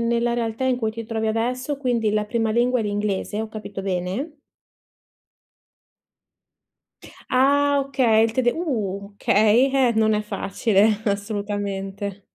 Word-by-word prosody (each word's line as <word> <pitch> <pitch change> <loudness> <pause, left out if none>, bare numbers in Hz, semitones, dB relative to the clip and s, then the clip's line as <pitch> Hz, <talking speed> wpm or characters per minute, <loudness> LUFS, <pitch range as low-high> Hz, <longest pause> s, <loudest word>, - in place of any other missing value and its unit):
nella 235 +1 +1
realtà 230 +1 -2
in 260 -1 +2
cui 220 -3 -1
ti 230 +1 -7
trovi 220 -1 -2
adesso, 250 +5 -1
quindi 240 -5 0
la 210 0 0
prima 225 +1 -1
lingua 245 +2 +2
è - - -1
l'inglese, 205 0 -2
ho 220 - -3
capito 215 -2 -7
bene? 190 - -3 3.0
Ah, 285 +2 +3
okay 250 -5 +3
il 225 - -1
tede 240 0 +2
uh, 205 - -3
okay, 220 +6 +4
eh, 260 -3 +3
non 220 0 +3
è 210 - +1
facile, 210 0 +1
assolutamente. 200 -1 -3
220 Hz, 130 wpm, -23 LUFS, 205-245 Hz, 3.0 s, okay